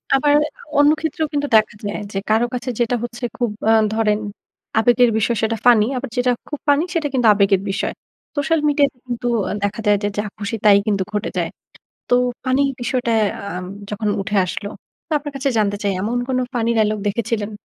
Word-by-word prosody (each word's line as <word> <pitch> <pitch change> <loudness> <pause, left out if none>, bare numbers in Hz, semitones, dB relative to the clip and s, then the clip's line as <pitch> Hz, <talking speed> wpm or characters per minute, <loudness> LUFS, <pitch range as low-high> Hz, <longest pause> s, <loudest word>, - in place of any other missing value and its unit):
আবার 290 +2 +3 0.4
অন্য 290 +1 +6
ক্ষেত্রেও 320 0 -2
কিন্তু 290 0 0
দেখা 215 -1 +3
যায় 205 +1 -3
যে, 195 - -4
কারো 220 +2 +3
কাছে 250 +1 -3
যেটা 240 +1 +1
হচ্ছে 240 +1 -7
খুব 240 -3 0 0.2
আ - - +6 0.2
ধরেন 215 -1 +1 0.6
আবেগের 245 +1 +4
বিষয় 220 +1 +1
সেটা 225 0 0
ফানি 230 -4 +6
আবার 250 0 -4
যেটা 245 0 +3 0.2
খুব 295 - -4
ফানি 290 +3 +4
সেটা 320 -3 0
কিন্তু 245 -3 +3
আবেগের 195 -1 +3
বিষয়। - - -2 0.4
সোশ্যাল 315 +2 +1
মিডিয়াতে 280 -3 +2
কিন্তু 245 0 -3 0.4
দেখা 205 +2 -1
যায় 205 -1 +5
যে, 205 - +2
যা 205 - 0
খুশি 210 +2 -3
তাই 205 -1 +8
কিন্তু 200 -2 +1
ঘটে 210 - -1
যায়। - - 0 0.6
তো - - +5 0.3
ফানি 260 +2 +2 0.2
বিষয়টা 245 -1 -1 0.3
আ - - -7 0.4
যখন 210 0 -2
উঠে 205 +1 -2
আসলো 200 +3 -4 0.4
তো - - -5
আপনার 290 0 -7
কাছে 275 +1 0
জানতে 205 -1 +1
চাই 200 -1 +1
এমন 235 +4 -1
কোন 260 -1 0 0.2
ফানি 230 -1 +1
ডায়ালগ 215 -1 +2
দেখেছিলেন 215 0 -2
235 Hz, 185 wpm, -20 LUFS, 210-265 Hz, 0.6 s, তাই